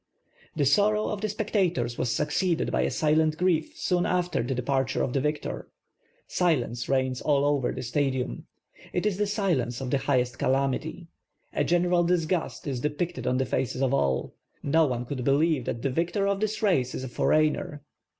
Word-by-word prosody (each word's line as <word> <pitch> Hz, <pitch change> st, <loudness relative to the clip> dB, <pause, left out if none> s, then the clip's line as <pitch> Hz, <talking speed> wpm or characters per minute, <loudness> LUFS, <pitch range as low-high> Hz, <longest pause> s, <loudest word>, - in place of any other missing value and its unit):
The 145 Hz, -, +1 dB
sorrow 210 Hz, +9 st, +3 dB
of 210 Hz, -1 st, -3 dB
the 215 Hz, -, -1 dB
spectators 185 Hz, -, 0 dB
was 125 Hz, -, 0 dB
succeeded 170 Hz, +5 st, 0 dB
by -, -, +1 dB
a -, -, +1 dB
silent 155 Hz, 0 st, +2 dB
grief 170 Hz, -3 st, 0 dB
soon 175 Hz, -1 st, +1 dB
after 180 Hz, -1 st, 0 dB
the 125 Hz, +3 st, -2 dB
dejxirture 135 Hz, 0 st, 0 dB
of 125 Hz, -, -2 dB
the 135 Hz, -, +1 dB
victor. 150 Hz, +1 st, -3 dB, 0.6 s
Silence 125 Hz, -9 st, 0 dB
rei.gns 130 Hz, -1 st, 0 dB
all 145 Hz, -2 st, +2 dB
over 145 Hz, -4 st, +1 dB
the -, -, -5 dB
Stadiinn. 130 Hz, -, -1 dB, 0.5 s
It 180 Hz, -, -1 dB
is 205 Hz, -3 st, +1 dB
the 210 Hz, -, +1 dB
silence 170 Hz, -, 0 dB
of 130 Hz, -2 st, -4 dB
the 140 Hz, -, +2 dB
highest 125 Hz, -2 st, 0 dB
calamity. 140 Hz, +5 st, -1 dB, 0.5 s
A -, -, +1 dB
gen 175 Hz, 0 st, +2 dB
eral 175 Hz, -1 st, +2 dB
disgust 175 Hz, -1 st, -1 dB
is 135 Hz, -4 st, -3 dB
dei)icted 160 Hz, +5 st, -2 dB
on 125 Hz, -, +2 dB
the 130 Hz, -, +1 dB
faces 130 Hz, +1 st, -1 dB
of 135 Hz, 0 st, +1 dB
all. 70 Hz, -, 0 dB, 0.3 s
No 160 Hz, +2 st, +3 dB
one 125 Hz, -2 st, -2 dB
could 130 Hz, 0 st, -4 dB
be 135 Hz, -, +2 dB
lieve 150 Hz, -2 st, +2 dB
that 115 Hz, -, -4 dB
the 135 Hz, -, 0 dB
victor 175 Hz, +7 st, 0 dB
of 200 Hz, 0 st, 0 dB
this 215 Hz, +1 st, -2 dB
race 135 Hz, -12 st, +2 dB
is -, -, -4 dB
a -, -, -4 dB
foreigner. 150 Hz, +2 st, +1 dB
150 Hz, 190 wpm, -27 LUFS, 130-175 Hz, 0.6 s, sorrow